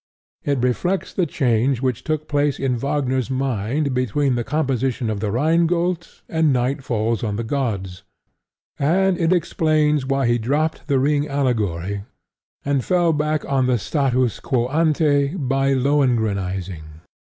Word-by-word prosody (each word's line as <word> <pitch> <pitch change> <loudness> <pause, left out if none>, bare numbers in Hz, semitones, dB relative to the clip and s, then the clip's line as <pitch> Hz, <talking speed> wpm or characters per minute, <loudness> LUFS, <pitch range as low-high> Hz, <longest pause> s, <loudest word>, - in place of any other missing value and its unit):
It 140 -1 0
reflects 175 +10 -1
the 180 -3 0
change 125 -2 +1
which 130 -3 -1
took 155 -1 -2
place 145 -1 +1
in 130 -2 0
Wagner's 130 -1 -1
mind 130 +2 -1
between 130 +2 +1
the 120 -1 -1
composition 130 -4 -1
of 105 - -3
The 105 0 -2
Rhine 160 +9 +2
Gold 175 0 -1 0.2
and 160 -2 +2
Night 130 +2 0
Falls 115 -2 -1
On 105 -3 -1
The 115 - -2
Gods; 105 -8 -3 0.8
and 185 +6 +2
it 170 0 +1
explains 155 -4 +2
why 135 -1 +1
he 120 0 +2
dropped 150 +9 -1
The 140 -3 +2
Ring 145 +2 +1
allegory 105 - -1 0.6
and 140 -2 +1
fell 175 -3 +2
back 150 0 -1
on 135 -2 +1
the 125 -1 +2
status 130 -1 0
quo 120 -2 0
ante 150 -1 +2
by 135 -3 +1
Lohengrinizing. 100 - -1
135 Hz, 145 wpm, -21 LUFS, 120-150 Hz, 0.8 s, Rhine